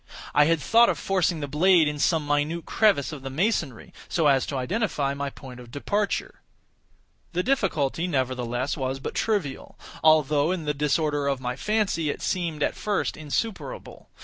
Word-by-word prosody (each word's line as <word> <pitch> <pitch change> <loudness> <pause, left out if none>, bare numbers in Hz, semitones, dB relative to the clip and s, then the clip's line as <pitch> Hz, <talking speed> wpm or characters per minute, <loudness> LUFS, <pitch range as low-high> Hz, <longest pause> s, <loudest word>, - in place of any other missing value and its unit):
I 150 - +5
had 165 +1 +2
thought 230 - +5
of - - 0
forcing 180 -4 0
the 145 - -3
blade 165 +3 +4
in 150 0 -3
some 160 +1 +2
minute 145 +3 -1
crevice 195 - +2
of 150 -3 -7
the 135 - -6
masonry, 155 - -1 0.2
so 165 - +1
as 135 -3 +3
to 140 - -3
identify 150 - -1
my 140 0 -3
point 130 -2 -11
of 120 -1 -12
departure. 200 - -2 0.9
The 180 +1 0
difficulty, 180 - 0
nevertheless, 130 -3 -1
was 130 -2 -2
but - - -5
trivial; 195 -12 -2 0.3
although, 155 -1 +4
in 180 -4 -3
the 150 - 0
disorder 145 0 0
of 140 -2 0
my 125 -1 -3
fancy, 200 -2 0
it - - -4
seemed 165 -5 -1
at - - +1
first 205 -2 -2
insuperable. 220 - -5
150 Hz, 170 wpm, -25 LUFS, 140-180 Hz, 0.9 s, I